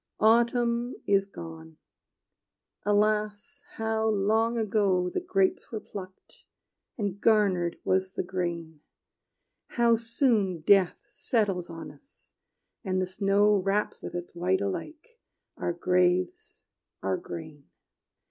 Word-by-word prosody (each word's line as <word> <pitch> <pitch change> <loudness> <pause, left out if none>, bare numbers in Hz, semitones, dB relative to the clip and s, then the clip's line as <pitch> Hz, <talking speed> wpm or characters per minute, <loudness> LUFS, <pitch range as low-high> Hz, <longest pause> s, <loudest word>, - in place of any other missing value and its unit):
Autumn 235 +2 +3
is 195 -1 +2
gone: 160 -4 -10 1.1
alas, 210 +5 0
how 220 0 -1
long 220 +3 +1
ago 200 -5 +1
The - - -1
grapes 195 - 0
were 220 - -3
plucked, 190 -3 -11 0.5
and 205 -3 -3
garnered 195 -6 +2
was 190 0 0
the - - -2
grain! 170 -4 -4 1.0
How 235 -1 +4
soon 225 - +1
death 190 +1 +4
settles 195 -7 -1
on 165 -1 -8
us, 275 - -23 0.5
and 185 -3 -1
the 185 - +1
snow 200 +2 +3
Wraps 195 +2 -1
with - - -7
its 175 0 -6
white 180 +2 +1
alike 310 - -5 0.4
our - - -2
graves, 185 - 0 0.4
our - - 0
gain! 155 - -9
200 Hz, 110 wpm, -28 LUFS, 180-225 Hz, 1.1 s, How